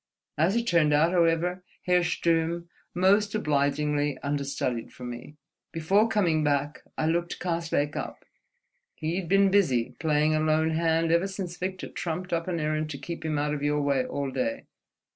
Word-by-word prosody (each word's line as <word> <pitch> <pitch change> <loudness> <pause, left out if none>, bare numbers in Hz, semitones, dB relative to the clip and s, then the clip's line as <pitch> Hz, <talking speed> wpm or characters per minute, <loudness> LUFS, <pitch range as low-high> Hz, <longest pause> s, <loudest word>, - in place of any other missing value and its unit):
As 165 +7 +2
it 235 0 +1
turned 165 -8 +3
out, 160 +3 +4
however, 175 +1 +1 0.2
Herr 180 0 +4
Sturm 170 0 0 0.3
most 200 +3 +3
obligingly 145 -4 0
understudied 140 -4 -2
for 125 - -12
me.... 120 +4 -8 0.4
Before 195 +7 +2
coming 170 -8 +2
back, 145 0 0 0.2
I 155 - 0
looked 170 +2 0
Karslake 165 -4 -1
up. - - -6 0.7
He'd 170 +2 -3
been 195 0 +4
busy, 130 -11 +2
playing 155 0 +2
a 155 - +2
lone 155 +1 +2
hand, 165 0 +1
ever 170 +3 +3
since 185 -2 -5
Victor 185 +1 -4
trumped 180 +2 -4
up 165 +1 -1
an 175 -2 -1
errand 155 0 -1
to 145 - -5
keep 165 +5 -7
him 155 -2 -1
out 150 +1 0
of 145 - -3
your 145 0 +1
way 140 -2 +2
all 140 +1 -3
day. 280 - -2
160 Hz, 165 wpm, -27 LUFS, 150-180 Hz, 0.7 s, out